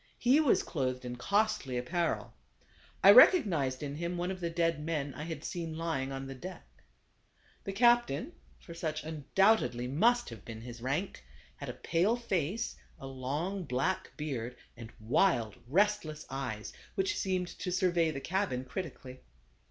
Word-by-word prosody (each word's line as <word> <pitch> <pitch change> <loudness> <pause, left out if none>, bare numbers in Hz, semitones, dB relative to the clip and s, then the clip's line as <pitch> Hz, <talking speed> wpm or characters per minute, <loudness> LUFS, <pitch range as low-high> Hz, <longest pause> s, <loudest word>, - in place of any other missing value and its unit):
He 255 +5 +4
was 300 -5 +3
clothed 130 -4 -2
in 125 0 -5
costly 200 - 0
apparel. 170 +8 -1 0.7
I - - +11
recognized 170 - +6
in 145 0 -4
him 170 +2 -3
one 175 +2 -1
of 190 - -5
the 170 -1 -2
dead 165 -2 0
men 150 -4 -2
I 150 +4 -6
had 160 -1 -6
seen 165 -2 -4
lying 160 -5 -2
on 135 0 -5
the 135 - -6
deck. 180 +8 -9 1.0
The 195 - -2
captain 240 - +3 0.3
(for 170 - -11
such 155 -2 -3
undoubtedly 155 - +2
must 235 - +3
have 110 -4 -10
been 110 -1 -8
his 120 0 -9
rank) 140 +10 -2 0.3
had - - -6
a - - -4
pale 180 +7 +1
face, 205 -3 -2 0.2
a - - -8
long 145 +9 -3
black 135 +6 -1
beard, 125 -6 -4 0.2
and 115 -1 -10
wild, 115 - +2
restles 180 -3 +1
eyes, 110 -6 -4 0.2
which 390 +2 0
seemed 185 -2 -1
to 180 - -3
survey 175 -3 +2
the 145 -3 -4
cabin 180 -9 -1
critically. 130 -5 -7
160 Hz, 155 wpm, -31 LUFS, 130-190 Hz, 1.0 s, I